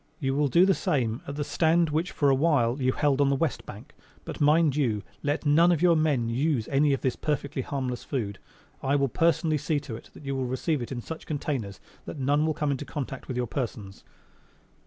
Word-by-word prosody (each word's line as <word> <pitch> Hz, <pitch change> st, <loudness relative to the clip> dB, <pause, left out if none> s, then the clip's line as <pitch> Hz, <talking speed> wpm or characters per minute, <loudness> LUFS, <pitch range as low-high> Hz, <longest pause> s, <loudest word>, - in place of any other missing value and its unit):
You 135 Hz, -2 st, -1 dB
will 145 Hz, +1 st, +2 dB
do 170 Hz, +8 st, +5 dB
the 195 Hz, -, +4 dB
same 120 Hz, -9 st, -1 dB
at 140 Hz, -, -5 dB
the 145 Hz, -, -2 dB
stand 165 Hz, +1 st, +2 dB
which 160 Hz, +4 st, 0 dB
for 140 Hz, -2 st, +2 dB
a -, -, +5 dB
while 135 Hz, -3 st, +2 dB
you 130 Hz, 0 st, +3 dB
held 145 Hz, 0 st, +1 dB
on 140 Hz, -, +4 dB
the 140 Hz, -, +2 dB
west 140 Hz, -2 st, -2 dB
bank. -, -, -10 dB, 0.3 s
But, -, -, -7 dB
mind 150 Hz, 0 st, +4 dB
you, 115 Hz, -9 st, 0 dB, 0.2 s
let 145 Hz, +2 st, -1 dB
none 165 Hz, +4 st, +5 dB
of 170 Hz, -, +2 dB
your 175 Hz, -2 st, +5 dB
men 150 Hz, -7 st, +1 dB
use 125 Hz, 0 st, 0 dB
any 145 Hz, +1 st, +3 dB
of 135 Hz, -, -1 dB
this 130 Hz, -, 0 dB
perfectly 145 Hz, -2 st, -2 dB
harmless 130 Hz, -2 st, -4 dB
food. 105 Hz, -8 st, -3 dB, 0.4 s
I 135 Hz, +1 st, +1 dB
will 140 Hz, -1 st, +2 dB
personally 160 Hz, +2 st, +1 dB
see 150 Hz, +1 st, 0 dB
to 130 Hz, -6 st, -7 dB
it 115 Hz, -, -12 dB
that 150 Hz, -, -12 dB
you 135 Hz, 0 st, -2 dB
will 130 Hz, -1 st, -2 dB
receive 135 Hz, +3 st, -1 dB
it 120 Hz, -, -6 dB
in 120 Hz, -2 st, -4 dB
such 160 Hz, +6 st, -8 dB
containers 135 Hz, -9 st, -3 dB, 0.3 s
that -, -, -7 dB
none 145 Hz, +3 st, +1 dB
will 155 Hz, -, 0 dB
come 150 Hz, -2 st, 0 dB
in 135 Hz, -, -1 dB
contact 135 Hz, -1 st, -6 dB
with 125 Hz, -, -4 dB
your 125 Hz, -, 0 dB
persons." 110 Hz, -6 st, -5 dB
140 Hz, 225 wpm, -27 LUFS, 130-155 Hz, 0.4 s, do